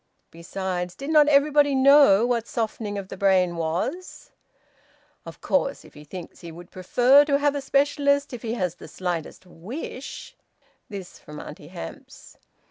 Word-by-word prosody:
Besides, 180 +1 -5
did 275 +3 -5
not 300 -2 +6
everybody 290 0 +4
know 265 -6 +6
what 235 -2 -1
softening 215 -2 -3
of 195 -1 -6
the - - -8
brain 185 -3 +2
was? 175 - -4 1.0
"Of - - -11
course, 280 0 -1
if - - -17
he 150 - -13
thinks 175 +3 -10
he 170 - -9
would 175 +2 -13
prefer 245 +9 +4
to 280 -1 +2
have 290 0 +1
a 285 - -3
specialist, 280 0 +1
if 240 - -7
he 230 -1 -3
has 180 -6 -2
the 175 - -13
slightest 175 -1 -5
wish 225 - -8 0.3
" - - -39
This 195 -4 -9
from 150 0 -11
Auntie 150 0 -10
Hamps. 255 - -11
225 Hz, 160 wpm, -24 LUFS, 180-280 Hz, 1.0 s, not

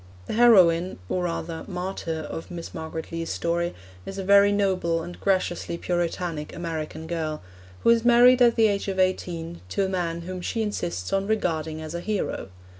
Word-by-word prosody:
The - - -4
heroine, 185 -7 +5
or 180 -1 0
rather 165 -1 -4
martyr, 180 -4 -4
of 160 - -7
Miss 170 -2 -7
Margaret 160 0 -6
Lee's 165 0 -4
story 170 +1 -1 0.3
is 195 - -7
a 195 - -3
very 200 +1 +6
noble 185 -5 +1
and 175 +1 -9
graciously 185 -3 0
Puritanic 170 -3 -2
American 160 -2 -5
girl, 160 -2 -3 0.4
who - - +6
is 230 -1 +3
married 245 +1 +6
at 235 -1 +6
the 225 - +4
age 200 -2 +1
of 195 -1 -2
eighteen 170 -3 -1
to 195 - 0
a - - -2
man 170 -3 -2
whom 185 +1 -6
she 225 +5 -1
insists 90 - -3
on 195 0 +1
regarding 160 -7 -1
as 155 +1 -6
a 170 - -3
hero. 210 - -2
175 Hz, 180 wpm, -25 LUFS, 165-195 Hz, 0.4 s, very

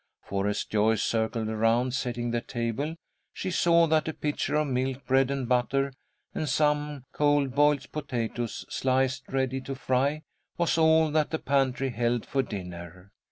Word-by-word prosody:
For, 100 0 -2
as 105 - -1
Joyce 110 0 +2
circled 110 0 0
around, 115 +3 +1
setting 120 -2 -2
the 120 0 0
table, 120 +7 -3 0.4
she 185 - -4
saw 170 -1 +4
that 160 -1 +2
a 160 - -3
pitcher 150 0 -2
of 150 0 +2
milk, 130 0 -2
bread 135 0 +3
and 135 -3 -2
butter, 135 +2 +1 0.4
and 155 - -2
some 150 -1 0
cold 145 -3 +2
boiled 145 -1 +2
potatoes, 120 -5 -3
sliced 130 0 0
ready 135 0 -1
to 135 +1 -5
fry, 135 +4 0 0.3
was 170 -1 +1
all 160 -1 +4
that 155 -1 +2
the 160 - -1
pantry 135 -2 0
held 120 0 0
for 135 - 0
dinner. 90 -4 -8
130 Hz, 160 wpm, -27 LUFS, 120-145 Hz, 0.4 s, saw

